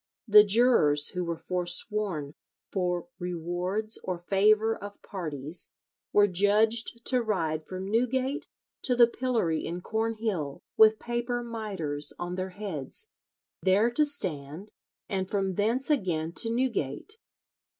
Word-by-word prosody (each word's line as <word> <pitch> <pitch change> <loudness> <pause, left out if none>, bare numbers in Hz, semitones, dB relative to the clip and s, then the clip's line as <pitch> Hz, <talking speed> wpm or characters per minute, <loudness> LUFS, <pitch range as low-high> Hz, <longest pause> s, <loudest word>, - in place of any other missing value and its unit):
The 210 -1 +9
jurors 200 -10 +3
who 180 - -3
were 170 -1 -3
forsworn 180 -3 -2 0.4
"for 180 -1 -1
rewards 180 +5 -2
or 185 -1 -2
favour 215 +5 +3
of 205 0 -9
parties 155 -4 -5 0.4
were 205 - +6
judged 215 +5 +2
to 255 -2 +2
ride 160 -8 -1
from 185 +1 -5
Newgate 255 +5 0 0.3
to 250 - +1
the 240 -1 +8
pillory 235 -10 -1
in 175 +2 -4
Cornhill 220 -9 -2
with 220 0 +6
paper 240 +1 -2
mitres 195 -11 -4
on 175 0 -4
their 185 +1 -3
heads, 190 - -7 0.5
there 200 +5 +3
to 300 +6 +3
stand, 180 - -2 0.3
and 190 -3 -2
from 195 -2 0
thence 230 - 0
again 170 - 0
to 225 - +1
Newgate." 240 - -2
200 Hz, 125 wpm, -28 LUFS, 175-225 Hz, 0.5 s, The